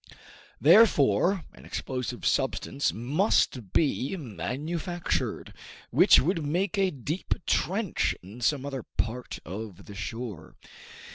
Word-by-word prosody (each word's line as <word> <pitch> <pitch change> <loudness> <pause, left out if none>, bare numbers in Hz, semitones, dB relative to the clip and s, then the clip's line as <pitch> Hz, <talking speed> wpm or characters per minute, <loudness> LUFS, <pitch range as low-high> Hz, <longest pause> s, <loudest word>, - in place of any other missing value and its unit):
Therefore 175 - +5
an - - -15
explosive 125 -2 -4
substance 135 +1 0
must 125 - +1
be 145 - +1
manufactured, 155 - -3 0.4
which - - +7
would 165 +2 0
make 175 +7 0
a 195 -1 +2
deep 150 +3 -3
trench 195 +1 0
in 105 +7 -11
some 140 +2 +1
other 135 -2 -4
part 115 +2 -4
of 100 +1 -7
the 100 - -10
shore. 105 -4 -6
135 Hz, 110 wpm, -28 LUFS, 115-170 Hz, 0.4 s, which